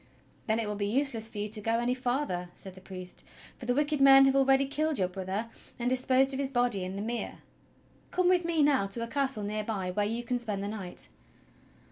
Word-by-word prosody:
"Then 220 Hz, 0 st, +2 dB
it 225 Hz, -2 st, -1 dB
will 210 Hz, -, -2 dB
be 205 Hz, 0 st, -2 dB
useless 235 Hz, -1 st, +1 dB
for 225 Hz, -, -11 dB
you 205 Hz, 0 st, -2 dB
to 215 Hz, 0 st, 0 dB
go 225 Hz, +2 st, 0 dB
any 240 Hz, +1 st, +1 dB
farther," 245 Hz, -8 st, -2 dB
said 190 Hz, -, -8 dB
the 190 Hz, -, -14 dB
priest, 185 Hz, -1 st, -8 dB, 0.4 s
"for 240 Hz, -, -8 dB
the 245 Hz, -, +2 dB
wicked 295 Hz, 0 st, +1 dB
men 270 Hz, 0 st, +8 dB
have 270 Hz, 0 st, +3 dB
already 270 Hz, 0 st, +4 dB
killed 305 Hz, +2 st, 0 dB
your 185 Hz, -, +1 dB
brother 190 Hz, +4 st, -4 dB, 0.3 s
and 245 Hz, 0 st, -1 dB
disposed 260 Hz, +1 st, +3 dB
of 265 Hz, -, -3 dB
his 275 Hz, -1 st, 0 dB
body 245 Hz, -7 st, +1 dB
in 185 Hz, +1 st, -5 dB
the 200 Hz, -, -3 dB
mere. 235 Hz, +1 st, -4 dB, 0.7 s
Come 365 Hz, -1 st, +1 dB
with 360 Hz, -1 st, +4 dB
me 335 Hz, -3 st, +2 dB
now 275 Hz, -9 st, +3 dB
to 230 Hz, +4 st, -3 dB
a -, -, -4 dB
castle 265 Hz, -3 st, -1 dB
near 210 Hz, +1 st, -2 dB
by 195 Hz, -4 st, -3 dB
where 205 Hz, +3 st, 0 dB
you 230 Hz, +2 st, -3 dB
can 245 Hz, +1 st, -1 dB
spend 210 Hz, -4 st, -3 dB
the -, -, -3 dB
night." 200 Hz, -4 st, -4 dB
235 Hz, 230 wpm, -29 LUFS, 205-270 Hz, 0.7 s, men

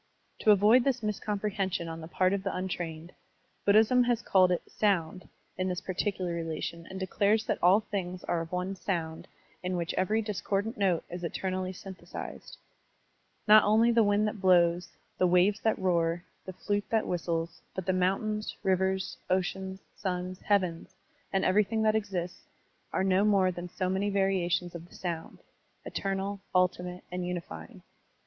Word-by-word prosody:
To -, -, +2 dB
avoid 210 Hz, +5 st, +6 dB
this 255 Hz, -3 st, 0 dB
miscomprehension 205 Hz, -4 st, -2 dB
on 165 Hz, 0 st, -6 dB
the 160 Hz, -, -8 dB
part 185 Hz, +2 st, +1 dB
of 200 Hz, -, 0 dB
the 195 Hz, -, -2 dB
tm 185 Hz, 0 st, -3 dB
trained, 170 Hz, -2 st, -5 dB, 0.5 s
Buddhism 220 Hz, +5 st, +5 dB
has 240 Hz, -1 st, +1 dB
called 185 Hz, -2 st, +4 dB
it 180 Hz, -, 0 dB
"Sound*' 185 Hz, -4 st, 0 dB, 0.3 s
in 185 Hz, -, 0 dB
this 180 Hz, -1 st, -1 dB
particular 185 Hz, -1 st, -2 dB
relation 170 Hz, 0 st, -4 dB
and 190 Hz, 0 st, -6 dB
declares 205 Hz, +3 st, +1 dB
that -, -, -1 dB
all 185 Hz, +5 st, +6 dB
things 185 Hz, -4 st, -4 dB
are 170 Hz, -, -1 dB
of 165 Hz, -, -7 dB
one 180 Hz, +2 st, -2 dB
Sound 165 Hz, -4 st, -3 dB, 0.3 s
in 180 Hz, 0 st, -2 dB
which 170 Hz, -1 st, -2 dB
every 215 Hz, +4 st, +1 dB
discordant 205 Hz, +1 st, -2 dB
note 190 Hz, -5 st, +1 dB
is 175 Hz, 0 st, -6 dB
eternally 185 Hz, +2 st, -2 dB
synthesized. 190 Hz, 0 st, -9 dB, 0.9 s
Not 215 Hz, +1 st, +8 dB
only 220 Hz, +3 st, +4 dB
the 230 Hz, 0 st, +4 dB
wind 205 Hz, 0 st, +3 dB
that 210 Hz, -2 st, -5 dB
blows, 175 Hz, -2 st, +4 dB, 0.3 s
the 185 Hz, -, +4 dB
waves 180 Hz, +4 st, +4 dB
that 220 Hz, -, +1 dB
roar, 170 Hz, -2 st, +1 dB, 0.2 s
the 185 Hz, -, -5 dB
flute 205 Hz, +2 st, -2 dB
that 225 Hz, -1 st, +1 dB
whis 175 Hz, -1 st, -3 dB
tles, 165 Hz, +1 st, -2 dB
but 190 Hz, -, -4 dB
the 190 Hz, -, +2 dB
motmtains, 195 Hz, +4 st, 0 dB
rivers, 190 Hz, 0 st, +1 dB
oceans, 190 Hz, +1 st, -1 dB
suns, 185 Hz, -1 st, -3 dB
heavens, 185 Hz, -5 st, 0 dB, 0.4 s
and 195 Hz, -, +1 dB
everything 210 Hz, +3 st, +2 dB
that 215 Hz, 0 st, +4 dB
exists, 190 Hz, -5 st, -3 dB, 0.4 s
are -, -, 0 dB
no 190 Hz, +1 st, +3 dB
more 195 Hz, -3 st, +4 dB
than 175 Hz, 0 st, -7 dB
so 185 Hz, +1 st, -2 dB
many 190 Hz, +2 st, 0 dB
variations 190 Hz, -3 st, +1 dB
of 170 Hz, 0 st, -9 dB
the -, -, -16 dB
Sotmd, 170 Hz, -3 st, -5 dB, 0.5 s
eternal, 195 Hz, +1 st, -2 dB, 0.2 s
tdtimate, 180 Hz, 0 st, +1 dB
and 180 Hz, 0 st, -3 dB
unifying. 170 Hz, -, -6 dB
185 Hz, 165 wpm, -29 LUFS, 175-205 Hz, 0.9 s, Not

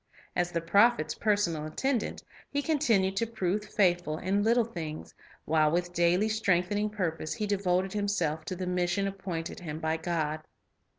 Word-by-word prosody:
As 175 Hz, 0 st, 0 dB
the 170 Hz, -, -1 dB
prophet's 185 Hz, -2 st, +3 dB
personal 180 Hz, -8 st, 0 dB
attendant, 245 Hz, -, -1 dB, 0.3 s
he 285 Hz, 0 st, -1 dB
continued 230 Hz, -, +2 dB
to 230 Hz, -, +1 dB
prove 210 Hz, -2 st, -1 dB
faithful 175 Hz, -7 st, +1 dB
in 195 Hz, +4 st, 0 dB
little 230 Hz, +2 st, +3 dB
things, 160 Hz, -8 st, -6 dB, 0.3 s
while 155 Hz, -1 st, +3 dB
with 175 Hz, +2 st, -1 dB
daily 175 Hz, +4 st, +3 dB
strengthening 205 Hz, -1 st, +1 dB
purpose 165 Hz, -6 st, -2 dB
he 215 Hz, -, -2 dB
devoted 190 Hz, -2 st, 0 dB
himself 180 Hz, -7 st, -1 dB
to 185 Hz, -, -4 dB
the 185 Hz, +1 st, -4 dB
mission 180 Hz, +2 st, 0 dB
appointed 190 Hz, -4 st, -4 dB
him 155 Hz, -3 st, -6 dB
by 160 Hz, 0 st, 0 dB
God. 160 Hz, -2 st, -2 dB
180 Hz, 155 wpm, -29 LUFS, 165-205 Hz, 0.3 s, prophet's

